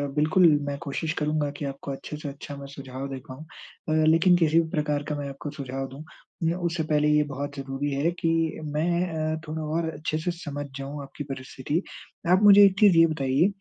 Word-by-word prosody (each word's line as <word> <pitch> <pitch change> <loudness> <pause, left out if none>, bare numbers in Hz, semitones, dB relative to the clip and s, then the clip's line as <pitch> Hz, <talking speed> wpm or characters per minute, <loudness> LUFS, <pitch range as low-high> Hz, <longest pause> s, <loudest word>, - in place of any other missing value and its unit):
बिल्कुल 155 +4 +5 0.2
मैं 140 0 -2
कोशिश 155 +3 -2
करूँगा 150 -1 0
कि 145 - -4
आपको 140 0 -5
अच्छे 145 +2 -6
से 150 -2 -5
अच्छा 140 +1 -8
मैं 140 0 -8
सुझाव 135 0 -6
दे 135 - -5
पाऊँ 140 +5 -9 0.4
अ, 155 0 +3
लेकिन 165 +3 +5
किसी 165 -1 +4
भी 160 - 0
प्रकार 150 -2 -1
का 150 - -1
मैं 140 -1 -4
आपको 140 +2 -7
सुझाव 135 0 -4
दूँ, 140 +4 -10 0.4
मेरा 170 +3 0
उससे 170 -2 -1
पहले 150 0 +3
ये 150 0 +4
बहुत 140 +1 -5
ज़रूरी 135 +1 -3
है 140 +5 +1
कि 165 -1 +1
मैं 160 +4 +1 0.5
अ, - - -8
थोड़ा 155 +1 -4 0.2
और 165 -1 -1
अच्छे 155 +1 -3
से 175 +3 -1
समझ 145 -4 -6
जाऊँ 140 +1 -6
आपकी 140 +2 -8
परिस्थिति। 135 +5 -3 0.5
आप 190 +3 +5
मुझे 205 0 +9
एक 195 0 +2
चीज़ 200 -5 +6
ये 165 - +8
बताइए 140 +1 +2
150 Hz, 205 wpm, -26 LUFS, 140-165 Hz, 0.5 s, मुझे